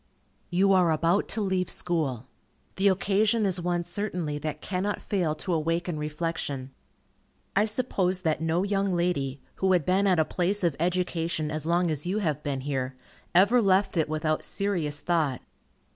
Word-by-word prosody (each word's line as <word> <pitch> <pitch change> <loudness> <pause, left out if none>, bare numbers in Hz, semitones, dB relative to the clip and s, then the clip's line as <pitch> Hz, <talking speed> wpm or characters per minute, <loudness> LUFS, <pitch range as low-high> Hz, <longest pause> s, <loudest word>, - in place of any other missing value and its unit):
_ - - -40 0.5
You 195 +2 +3
are 180 -3 +4
about 165 +5 +2
to 220 - -1
leave 185 -3 0
school. 145 -9 0 0.5
The 195 +1 +3
occasion 205 +3 +2
is 185 -2 0
one 175 0 0
certainly 175 -4 -3
that 150 0 -4
cannot 200 +2 -2
fail 175 -7 -1
to 180 +3 -2
awaken 165 +1 -1
reflection. 150 -3 -3 0.8
I 205 - +4
suppose 200 -5 0
that 160 -3 0
no 165 +3 +1
young 195 -2 0
lady, 145 -6 -1 0.2
who 190 -1 +2
had 175 -5 +2
been 195 +2 +2
at 185 -2 +3
a 160 - +3
place 190 +5 0
of 170 -5 +2
education 170 -3 -1
as 155 0 -3
long 170 0 +2
as 150 +2 -4
you 190 +3 0
have 160 -9 -1
been 140 -2 -3
here, 130 -2 -3 0.4
ever 205 +7 +6
left 195 -1 +2
it 160 -2 +1
without 155 0 -1
serious 175 -8 -1
thought. 155 -8 0
175 Hz, 170 wpm, -27 LUFS, 155-190 Hz, 0.8 s, ever